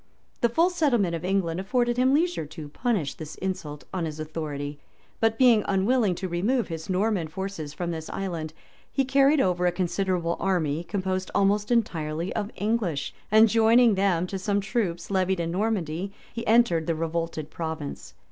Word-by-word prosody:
The 235 - +3
full 335 +9 +3
settlement 245 - +2
of 165 0 -4
England 180 -3 0
afforded 240 +4 +1
him 255 +2 +3
leisure 320 - +1
to 150 -1 -9
punish 195 - -1
this 155 -1 -8
insult 165 -6 -4
on 180 -3 -1
his 155 -1 -6
authority; 150 -2 -5 0.4
but 225 0 +2
being 235 -4 +5
unwilling 200 0 +2
to 185 - -4
remove 205 +8 0
his 160 0 -6
Norman 190 -2 +1
forces 165 -2 -5
from 175 +1 -3
this 160 -1 -5
island, 170 -5 -4 0.4
he 270 - +1
carried 275 +3 +4
over 180 -4 +2
a - - +3
considerable 175 -1 -1
army, 165 -5 0
composed 185 0 -2
almost 200 +1 +2
entirely 170 -8 0
of 210 -1 -2
English, 205 - -1 0.2
and 220 +2 +7
joining 225 +1 +5
them 190 -3 +2
to 190 +1 -5
some 205 +1 0
troops 195 -4 -2
levied 190 -1 +1
in 170 0 -1
Normandy, 190 -2 -1 0.2
he 230 0 -5
entered 215 -9 +4
the 165 - +1
revolted 165 -1 -3
province. 160 -3 -5
190 Hz, 165 wpm, -26 LUFS, 165-220 Hz, 0.4 s, and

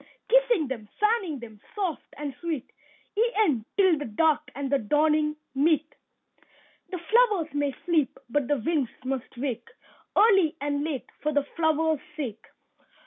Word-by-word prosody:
Kissing 485 - +4
them, 225 -5 -6
fanning 420 -8 +1
them, 220 -4 -11
soft 380 -7 -3
and 290 -1 -4
sweet, 325 -7 -3 0.5
E'en 420 - +2
till 375 -6 +5
the 290 - -4
dark 305 +8 +1
and 280 -1 -3
the 280 - +3
dawning 300 +5 +2 0.2
meet. 305 +2 +2 1.0
The 370 - -3
flowers 385 - +2
may 290 -2 0
sleep, 305 -5 +1
but 270 +1 0
the 290 - +2
winds 275 0 0 0.2
must 260 -1 -4
wake 250 -2 -3 0.5
Early 390 -7 +5
and 285 0 -1
late, 300 -4 -3 0.2
for 305 - 0
the 290 -1 +2
flowers' 320 -1 +2 0.2
sake. 235 -8 -4
300 Hz, 140 wpm, -27 LUFS, 275-340 Hz, 1.0 s, till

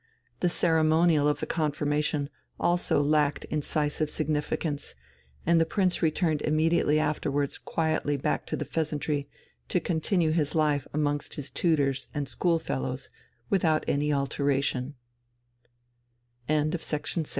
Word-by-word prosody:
The 175 - +2
ceremonial 160 -2 +3
of 150 - 0
the - - -1
confirmation 150 -1 -1 0.3
also 175 -4 +2
lacked 150 0 +2
incisive 150 0 0
significance, 150 0 -2 0.5
and 170 0 +4
the - - +6
Prince 185 0 +1
returned 160 -1 +1
immediately 155 0 +2
afterwards 145 -2 -1
quietly 155 -3 -1
back 135 - -1
to - - -2
the - - -3
"Pheasantry" 150 -2 -2 0.4
to - - +1
continue 165 0 +1
his 155 -2 0
life 150 -3 +2
amongst 145 -1 -1
his 145 -2 -6
tutors 140 -6 +1
and 145 -1 -2
schoolfellows 145 - -1 0.4
without 165 -5 +2
any 150 +1 +1
alteration. 140 -1 0
150 Hz, 110 wpm, -28 LUFS, 145-160 Hz, 0.5 s, the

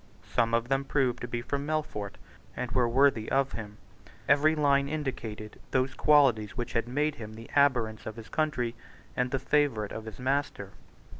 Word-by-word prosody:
Some 115 -1 +1
of 115 0 0
them 135 +1 +1
proved 130 -3 +1
to 120 - -3
be 120 0 -3
from 140 +2 -3
Melfort, 150 -10 -3 0.4
and 125 0 -3
were 120 -2 +2
worthy 130 -3 +3
of 135 0 +2
him. 105 -2 -7 0.5
Every 155 +2 +4
line 140 -2 +3
indicated 115 -8 -5
those 130 +1 +1
qualities 135 -8 +3
which 120 - -4
had 115 0 0
made 150 +5 0
him 110 -1 -8
the 115 +1 -11
abhorrence 120 -7 +2
of 110 - -5
his 115 -2 -10
country 135 -7 -1 0.4
and 125 0 0
the 135 - 0
favourite 130 -6 +1
of 110 - -6
his 110 - -8
master. 130 -6 -1
125 Hz, 175 wpm, -29 LUFS, 115-140 Hz, 0.5 s, Every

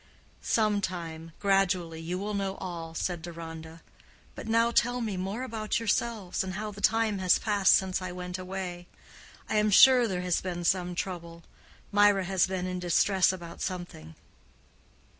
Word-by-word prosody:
"Some 215 -2 +1
time—gradually—you 170 0 -1
will 205 +2 -4
know 195 -1 -2
all," 165 -3 -7
said 175 0 -2
Deronda. 165 -1 -9 0.5
"But - - -9
now 230 +1 +3
tell 245 +1 +2
me 220 -5 -2
more 195 +7 -3
about 220 -4 -2
yourselves, 220 -4 -1
and 185 -1 -5
how 210 +2 -4
the 200 0 -11
time 220 -2 +2
has 185 -1 +4
passed 205 -3 +4
since 190 -1 0
I 185 -1 -4
went 180 0 -6
away. 185 -1 -6 0.6
I 215 - 0
am 210 0 +3
sure 250 +3 +7
there 185 -3 -2
has 180 -1 0
been 175 -2 -4
some 180 0 +1
trouble. 170 -2 -5 0.5
Mirah 205 -2 +4
has 190 0 +2
been 185 -1 -3
in 180 0 -3
distress 185 +2 +3
about 175 -3 -9
something." 175 - -6
185 Hz, 155 wpm, -28 LUFS, 175-205 Hz, 0.6 s, sure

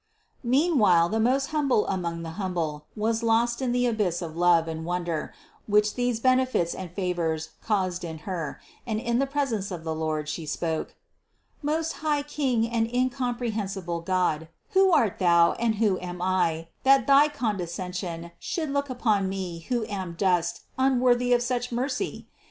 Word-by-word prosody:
Meanwhile 240 - +4
the 220 - 0
most 265 +5 +2
Humble 280 -8 +2
among 170 -3 -2
the 165 - -5
humble 160 -5 -3
was 225 +2 0
lost 235 +2 +2
in 255 -2 0
the 245 0 +2
abyss 200 -7 0
of 160 -2 -6
love 170 -1 +4
and 160 0 -4
wonder 170 -2 -2 0.4
which 210 0 +3
these 245 -2 0
benefits 255 -8 +2
and 185 -2 -6
favors 170 -4 -2
caused 185 -5 -1
in 160 -2 -5
Her, 170 -6 -4 0.3
and 215 -2 -1
in 235 +1 0
the 275 - +1
presence 270 -8 -1
of 175 -4 -6
the 160 -1 -2
Lord 155 -1 -2
She 155 +1 -4
spoke: 160 0 -2 0.7
"Most 315 +2 -1
high 300 -2 +1
King 265 -6 0
and 230 -1 0
incomprehensible 235 -8 -1
God, 170 -3 0 0.2
who 385 0 +5
art 240 - +2
Thou 170 -2 +5
and 230 -1 +1
who 205 -3 +1
am 180 0 -6
I, 175 -3 0
that 270 0 +5
thy 280 +1 +6
condescension 180 - -4
should 315 -4 -3
look 280 0 -1
upon 215 -6 +1
me 185 -3 -4
who 240 -3 0
am 190 -5 -4
dust, 175 -1 +1 0.2
unworthy 250 -2 +3
of 245 0 +4
such 245 0 -2
mercy? 255 +2 -3
210 Hz, 160 wpm, -26 LUFS, 175-250 Hz, 0.7 s, thy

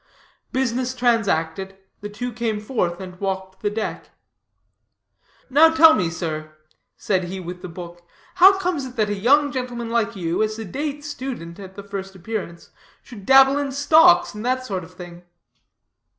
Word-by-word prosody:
Business 255 0 -1
transacted, 195 -6 0 0.2
the 205 - -7
two 245 +4 -5
came 225 -2 -2
forth, 210 -6 -2
and 185 -1 -9
walked 190 -1 -4
the 205 - 0
deck. 215 +1 -5 1.4
"Now 300 +5 +6
tell 325 0 +8
me, 180 - 0
sir," 155 -2 -5 0.4
said 185 -3 -1
he 190 +2 -6
with 180 0 -8
the 185 - -7
book, 175 0 -10 0.4
"how 385 +1 +8
comes 360 -6 -2
it 255 -1 -8
that 215 -3 0
a - - -1
young 285 +8 +3
gentleman 245 -3 -4
like 230 -3 0
you, 170 -1 -2
a 215 - +2
sedate 280 - -5
student 255 - -7
at 190 -1 -11
the 200 - -8
first 195 -1 -7
appearance, 185 -3 -6 0.3
should 205 -6 -12
dabble 270 +1 +6
in 285 -1 -2
stocks 285 - +5
and 210 +1 -7
that 255 +1 -1
sort 190 -6 -4
of 180 +2 -15
thing?" 175 -1 -11
210 Hz, 165 wpm, -22 LUFS, 185-260 Hz, 1.4 s, tell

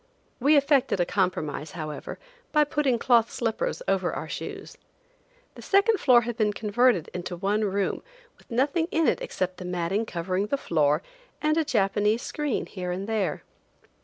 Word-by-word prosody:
We 290 +4 +5
effected 275 -6 +3
a 175 - +3
compromise, 160 -6 -2
however, 155 -3 -6 0.3
by 300 -1 +5
putting 295 -4 +1
cloth 230 -1 +3
slippers 250 - -2
over - - +1
our - - -5
shoes. - - -7 0.8
The - - -12
second 405 +1 +3
floor 250 -6 +6
had 240 0 -4
been 210 -2 +1
converted 215 -3 +2
into 180 0 -5
one 205 +4 0
room, 200 -1 -1 0.3
with - - -25
nothing 280 +7 +1
in 325 -1 +1
it - - +1
except 185 - -3
the 185 - -7
matting 180 +5 -1
covering 185 +3 -2
the 280 - 0
floor 155 - +1 0.4
and 305 0 +1
a 325 - +2
Japanese 210 -3 +1
screen 295 -5 -2
here 180 -2 -5
and 185 +2 -3
there. 220 -3 -1
215 Hz, 160 wpm, -26 LUFS, 185-280 Hz, 0.8 s, floor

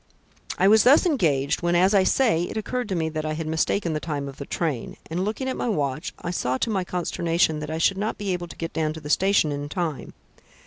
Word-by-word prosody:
"I 190 - +4
was 215 +2 +7
thus 280 +8 +6
engaged 155 - +1
when, 175 0 +1
as 185 +4 +4
I 200 - +6
say, 225 -11 +3
it 220 - -6
occurred 245 +2 -3
to 190 - -1
me 160 -2 0
that 155 0 -4
I 155 0 -2
had 160 +1 -4
mistaken 160 +3 0
the 155 - -1
time 145 -3 -4
of 135 - -9
the 140 - -7
train, 150 -9 -3
and, 175 +3 -1
looking 220 +6 -2
at 260 - -1
my - - -2
watch, 145 -7 -1
I 175 - -4
saw 130 -7 -1
to 225 - -1
my 190 -3 0
consternation 170 -2 0
that 150 0 -6
I 160 - -2
should 190 +4 +2
not 215 +2 -2
be 200 -2 -2
able 175 -1 -4
to - - -12
get 165 0 -5
down 155 -1 -1
to 160 - -8
the 150 -1 -5
station 190 -5 +3
in 145 0 -4
time. 165 -5 -3
170 Hz, 255 wpm, -24 LUFS, 155-195 Hz, -, was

